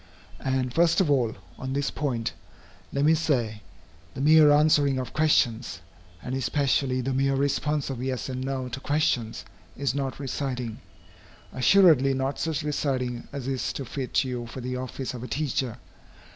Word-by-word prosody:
And 130 Hz, -2 st, -1 dB
first 170 Hz, +1 st, +3 dB
of 175 Hz, -6 st, +3 dB
all, 125 Hz, -5 st, +2 dB, 0.2 s
on 130 Hz, 0 st, -4 dB
this 140 Hz, 0 st, -1 dB
point, 120 Hz, -6 st, -2 dB, 0.6 s
let 140 Hz, +1 st, +1 dB
me 160 Hz, -, +6 dB
say, 120 Hz, -10 st, 0 dB, 0.5 s
the -, -, -4 dB
mere 155 Hz, +1 st, +7 dB
answering 145 Hz, -2 st, +4 dB
of 130 Hz, -2 st, -4 dB
questions, 120 Hz, -, +2 dB, 0.4 s
and 125 Hz, -, -4 dB
especially, 135 Hz, -1 st, +1 dB
the 135 Hz, +2 st, -2 dB
mere 135 Hz, +1 st, +2 dB
response 140 Hz, +1 st, 0 dB
of 125 Hz, -2 st, -5 dB
yes 130 Hz, -1 st, -2 dB
and 130 Hz, -1 st, -4 dB
no 130 Hz, -1 st, -3 dB
to 125 Hz, +2 st, -5 dB
questions, 135 Hz, -6 st, 0 dB, 0.3 s
is 140 Hz, -2 st, 0 dB
not 135 Hz, -1 st, -3 dB
reciting, 125 Hz, -4 st, -3 dB, 0.7 s
assuredly 135 Hz, -3 st, +5 dB
not 135 Hz, +1 st, -2 dB
such 160 Hz, -1 st, -1 dB
reciting 130 Hz, -5 st, -2 dB
as 140 Hz, -3 st, -5 dB
is 135 Hz, -2 st, -1 dB
to 135 Hz, -, -5 dB
fit 130 Hz, +2 st, -1 dB
you 125 Hz, -2 st, -4 dB
for 125 Hz, -, -8 dB
the 125 Hz, 0 st, -4 dB
office 130 Hz, +1 st, -4 dB
of 125 Hz, -, -7 dB
a 125 Hz, -, -6 dB
teacher. 130 Hz, -3 st, -2 dB
135 Hz, 160 wpm, -26 LUFS, 125-145 Hz, 0.7 s, mere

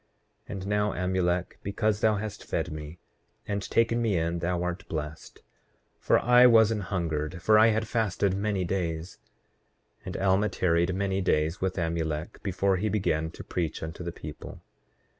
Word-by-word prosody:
8:26 -, -, -28 dB
And 95 Hz, -1 st, -6 dB
now, 105 Hz, 0 st, +1 dB
Amulek, 90 Hz, -1 st, -1 dB
because 105 Hz, +1 st, 0 dB
thou 110 Hz, -2 st, +4 dB
hast 105 Hz, 0 st, -5 dB
fed 80 Hz, +1 st, -2 dB
me 75 Hz, +2 st, -7 dB, 0.5 s
and 100 Hz, 0 st, -1 dB
taken 115 Hz, +3 st, +1 dB
me 110 Hz, -6 st, +1 dB
in, 85 Hz, +1 st, -1 dB
thou 90 Hz, +1 st, -1 dB
art 90 Hz, +2 st, -4 dB
blessed; 75 Hz, 0 st, -6 dB, 0.6 s
for -, -, +3 dB
I 125 Hz, +1 st, +6 dB
was 115 Hz, -2 st, +6 dB
an 110 Hz, -, -1 dB
hungered, 85 Hz, -3 st, -2 dB
for 110 Hz, 0 st, +6 dB
I 110 Hz, -, +7 dB
had 110 Hz, 0 st, +1 dB
fasted 105 Hz, -5 st, 0 dB
many 100 Hz, -2 st, -1 dB
days. 85 Hz, -2 st, -3 dB, 0.8 s
8:27 -, -, -30 dB
And 90 Hz, -, -4 dB
Alma 95 Hz, +2 st, +2 dB
tarried 85 Hz, 0 st, +1 dB
many 95 Hz, 0 st, 0 dB
days 80 Hz, -1 st, +1 dB
with 95 Hz, 0 st, -1 dB
Amulek 80 Hz, -2 st, -2 dB
before 95 Hz, 0 st, +1 dB
he 105 Hz, +4 st, -1 dB
began 80 Hz, -6 st, 0 dB
to -, -, -10 dB
preach 85 Hz, -4 st, -3 dB
unto 80 Hz, +2 st, -6 dB
the 85 Hz, -, -4 dB
people. 75 Hz, -2 st, -9 dB
95 Hz, 170 wpm, -28 LUFS, 85-105 Hz, 0.8 s, I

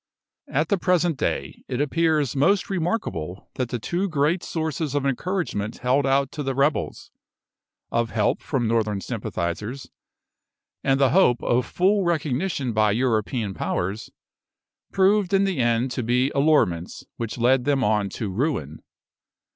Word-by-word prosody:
At 150 Hz, +3 st, 0 dB
the 200 Hz, -, +2 dB
present 175 Hz, -2 st, +2 dB
day, -, -, -3 dB
it 125 Hz, -, -3 dB
appears 150 Hz, -2 st, +1 dB
most 195 Hz, +9 st, +2 dB
remarkable 160 Hz, -, -3 dB
that 125 Hz, -2 st, -3 dB
the 120 Hz, -, -2 dB
two 175 Hz, -, -2 dB
great 155 Hz, +3 st, +1 dB
sources 160 Hz, -3 st, -3 dB
of 140 Hz, -1 st, 0 dB
encouragement 135 Hz, -, -2 dB
held 130 Hz, +3 st, +1 dB
out 135 Hz, 0 st, +2 dB
to 150 Hz, -, -5 dB
the 135 Hz, -2 st, -2 dB
rebels 140 Hz, +2 st, 0 dB, 0.8 s
of 115 Hz, 0 st, 0 dB
help 105 Hz, -2 st, 0 dB
from 125 Hz, -4 st, -1 dB
Northern 110 Hz, -3 st, 0 dB
sympathisers, 105 Hz, +10 st, -4 dB, 0.9 s
and 135 Hz, 0 st, +2 dB
the 135 Hz, -2 st, +4 dB
hope 145 Hz, -10 st, +4 dB
of 120 Hz, 0 st, +1 dB
full 195 Hz, +2 st, +2 dB
recognition 155 Hz, -4 st, -1 dB
by 105 Hz, -1 st, +3 dB
European 110 Hz, -2 st, 0 dB
powers 95 Hz, +3 st, -3 dB, 0.8 s
proved 195 Hz, 0 st, +3 dB
in 195 Hz, -, +4 dB
the 195 Hz, -6 st, -1 dB
end 120 Hz, +1 st, +1 dB
to 125 Hz, -, -2 dB
be 125 Hz, +4 st, +1 dB
allurements 140 Hz, -, +1 dB
which 115 Hz, 0 st, -4 dB
led 125 Hz, +1 st, +3 dB
them 140 Hz, -2 st, +2 dB
on 105 Hz, -2 st, +1 dB
to 100 Hz, +1 st, -4 dB
ruin. 95 Hz, -, -2 dB
135 Hz, 145 wpm, -24 LUFS, 115-160 Hz, 0.9 s, the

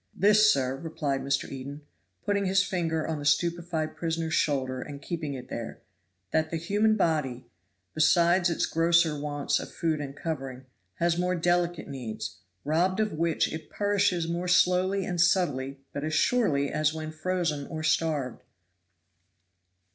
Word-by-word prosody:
"This, 210 Hz, +2 st, +5 dB
sir," 135 Hz, -6 st, 0 dB
replied 145 Hz, -3 st, -2 dB
Mr. 140 Hz, 0 st, -1 dB
Eden, 140 Hz, +2 st, -7 dB, 0.4 s
putting 200 Hz, -1 st, +1 dB
his 195 Hz, +1 st, +3 dB
finger 165 Hz, -5 st, -1 dB
on 160 Hz, -2 st, -2 dB
the -, -, -6 dB
stupefied 165 Hz, +1 st, 0 dB
prisoner's 165 Hz, -1 st, -2 dB
shoulder 130 Hz, -4 st, 0 dB
and 145 Hz, -1 st, -7 dB
keeping 150 Hz, -1 st, -4 dB
it 125 Hz, -, -8 dB
there; -, -, -6 dB, 0.5 s
"that 160 Hz, 0 st, +1 dB
the 165 Hz, -, -2 dB
human 205 Hz, +6 st, +2 dB
body, 150 Hz, -, 0 dB, 0.5 s
besides 170 Hz, +3 st, +4 dB
its 170 Hz, -, 0 dB
grosser 165 Hz, -1 st, +3 dB
wants 145 Hz, -1 st, -1 dB
of -, -, -7 dB
food 160 Hz, -3 st, -1 dB
and 140 Hz, -1 st, -6 dB
covering, 135 Hz, -5 st, -5 dB, 0.3 s
has 170 Hz, 0 st, +2 dB
its 175 Hz, -, -1 dB
more 180 Hz, 0 st, +1 dB
delicate 175 Hz, -1 st, 0 dB
needs, 110 Hz, -6 st, -6 dB, 0.3 s
robbed 175 Hz, +6 st, +1 dB
of 215 Hz, -1 st, +1 dB
which 165 Hz, 0 st, 0 dB
it 160 Hz, -, -7 dB
perishes 200 Hz, -4 st, +1 dB
more 170 Hz, +2 st, -2 dB
slowly 185 Hz, +2 st, +3 dB
and 175 Hz, -2 st, 0 dB
subtly 145 Hz, -7 st, +1 dB, 0.2 s
but 140 Hz, -, -4 dB
as 155 Hz, 0 st, -1 dB
surely 145 Hz, -, +2 dB
as 155 Hz, 0 st, +1 dB
when 155 Hz, 0 st, -5 dB
frozen 155 Hz, -3 st, -2 dB
or 155 Hz, -1 st, -5 dB
starved. 155 Hz, -6 st, 0 dB
160 Hz, 155 wpm, -28 LUFS, 145-175 Hz, 0.5 s, This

